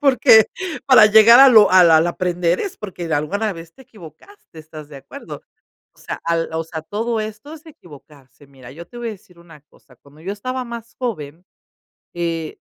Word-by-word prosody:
porque 255 -6 +4 0.4
para 255 -5 +6
llegar 220 +3 +6
a 275 - +8
lo 220 -4 +5
al 180 -2 +5
al 160 +1 +4
aprender 175 0 -2
es 395 - -6
porque 180 -4 -8
de 160 - -1
alguna 200 +9 -3
vez 165 -1 -13
te - - -17
equivocaste, 215 - -17
¿estás 155 -1 -13
de 145 - -13
acuerdo?, 135 - -12 0.5
o - - -31
sea, - - -8
al, 165 0 -2
o 160 0 -3
sea, 160 -1 -8
todo 225 +7 -4
esto 215 +7 -9
es 320 +1 -14
equivocarse. 145 - -18
Mira, 130 -3 -16
yo 165 +5 -12
te 240 - -16
voy 240 -1 -6
a - - -4
decir 190 -3 -16
una 165 -3 -18
cosa, 130 -3 -26
cuando 145 +5 -22
yo 190 +4 -5
estaba 255 +5 -6
más 235 -1 -10
joven, 175 - -7 0.7
eh, 165 -2 -5
175 Hz, 195 wpm, -18 LUFS, 160-225 Hz, 0.7 s, a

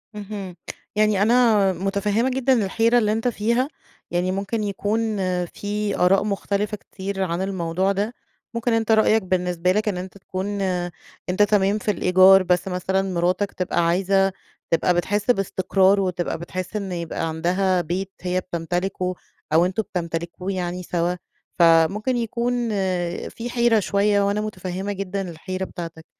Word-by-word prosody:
اهم، 200 -3 -6 0.4
يعني 210 -2 +3
أنا 220 -4 +4
متفهمة 200 +6 0
جدًا 265 0 +2
الحيرة 230 +5 +2
اللي 215 -3 +2
أنتَ 225 +3 0
فيها، 235 +3 +1 0.4
يعني 180 +1 0
ممكن 200 +3 -2
يكون 210 +2 -1 0.3
في 205 +3 -3
آراء 190 +3 +4
مختلفة 205 +1 -1
كتير 195 0 -5
عن 170 0 -2
الموضوع 190 0 0
ده، 205 +4 -1 0.4
ممكن 235 0 0
أنتَ 225 0 +1
رأيك 220 0 +4
بالنسبة 180 -1 0
لك 210 +2 0
إن 190 - -2
أنتَ 185 +2 -7
تكون 195 +2 -4
آآ، 180 -2 -1 0.4
أنتَ 185 +3 +3
تمام 205 0 +2
في 210 - 0
الإيجار 185 0 +6
بس 180 +1 +1
مثلًا 190 +1 0
مراتك 185 +1 0
تبقى 175 -2 0
عايزة 195 +2 +2 0.4
تبقى 165 +2 +3
بتحس 205 +6 +1
باستقرار، 195 -1 +2
وتبقى 180 -3 -1
بتحس 185 +4 -6
إنّه 195 -4 -3
يبقى 165 -1 -3
عندها 180 +3 +1
بيت 185 +4 -3
هيّ 180 0 0
بتمتلكه 180 +1 -2 0.4
أو 165 +2 +5
أنتم 190 +4 -1
بتمتلكوه 170 +1 -4
يعني 180 -1 -3
سوا، 175 0 -1 0.4
فممكن 170 +9 +4
يكون 235 +1 -1 0.6
في 235 +1 -6
حيرة 235 -2 +3
شويّة، 200 +1 +2
وأنا 200 +1 +1
متفهمة 190 -1 -4
جدًا 195 -1 -4
الحيرة 185 +3 -5
بتاعتك. 165 -2 -8
195 Hz, 145 wpm, -23 LUFS, 180-210 Hz, 0.6 s, الإيجار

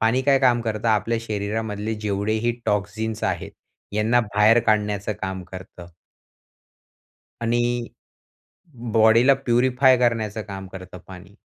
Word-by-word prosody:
पाणी 115 +4 +2
काय 140 0 +4
काम 125 -3 +3
करतं, 110 0 -2
आपल्या 115 +2 +1
शरीरामधले 105 0 -3
जेवढे 100 0 -1
ही 120 - +2
टॉक्सिन्स 105 +2 -2
आहेत, 90 -3 -2 0.4
यांना 110 +4 +2
बाहेर 105 +1 +3
काढण्याचं 105 -1 0
काम 95 -1 -4
करतं. 90 -1 -10 1.6
आणि 120 +1 +1 1.3
बॉडीला 115 +4 +5
प्युरिफाय 130 0 +3
करण्याचं 115 -3 0
काम 95 -1 -7
करतं 95 -1 -10
पाणी. 95 +1 -13
110 Hz, 115 wpm, -23 LUFS, 100-120 Hz, 1.6 s, बॉडीला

